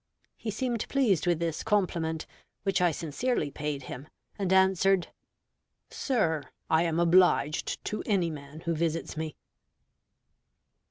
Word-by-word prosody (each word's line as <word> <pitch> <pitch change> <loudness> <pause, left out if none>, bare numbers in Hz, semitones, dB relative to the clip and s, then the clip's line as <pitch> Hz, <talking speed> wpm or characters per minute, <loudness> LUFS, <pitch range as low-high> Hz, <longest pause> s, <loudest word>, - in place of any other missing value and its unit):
He 225 - -5
seemed 235 +1 -2
pleased 210 - +2
with 175 -2 +3
this 165 -1 -2
compliment, 170 -7 0 0.4
which 195 -2 +1
I 175 - +5
sincerely 160 - -1
paid 145 -1 -3
him, 130 +3 -8 0.3
and 190 -2 0
answered, 190 -1 +4 0.8
"Sir, 170 - 0 0.3
I 160 - +5
am 165 -1 +1
obliged 170 -3 +3
to 215 - -2
any 185 -6 +2
man 150 +1 -9
who 170 0 -1
visits 165 +1 -1
me." 155 -1 -4
170 Hz, 125 wpm, -29 LUFS, 160-195 Hz, 0.8 s, I